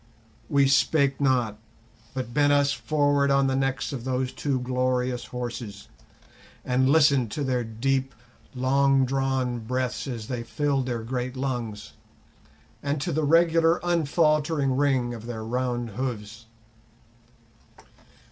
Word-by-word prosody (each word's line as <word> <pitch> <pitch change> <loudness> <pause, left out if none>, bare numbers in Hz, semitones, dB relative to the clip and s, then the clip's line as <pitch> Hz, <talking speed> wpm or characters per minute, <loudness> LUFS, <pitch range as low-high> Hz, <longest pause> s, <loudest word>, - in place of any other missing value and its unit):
We 140 -1 +4
spake 140 0 +2
not, 120 -6 +1 0.6
but 125 -3 -4
bent 145 0 +3
us 140 -1 +3
forward 145 -2 +1
on 140 0 +3
the 135 0 +1
necks 135 +2 -1
of 125 -4 -5
those 130 0 -1
two 140 -3 -1
glorious 125 0 -1
horses, 120 -5 -6 0.8
and 130 +1 +2
listened 140 -5 +4
to 145 - -2
their 125 -2 0
deep, 130 +4 -1 0.4
long 135 +1 +3
drawn 130 -2 -1
breaths 125 +3 -3
as 115 -5 -5
they 125 -2 -3
filled 135 +2 -1
their 120 -3 -3
great 125 +2 -4
lungs, 120 -6 -4 0.9
and 145 +1 -1
to 135 - -2
the 155 +2 0
regular 165 +2 +4
unfaltering 155 -4 +1
ring 130 -3 +1
of 115 0 -9
their 110 -2 -5
round 120 0 -2
hoofs. 115 -1 -5
130 Hz, 130 wpm, -25 LUFS, 125-140 Hz, 0.9 s, We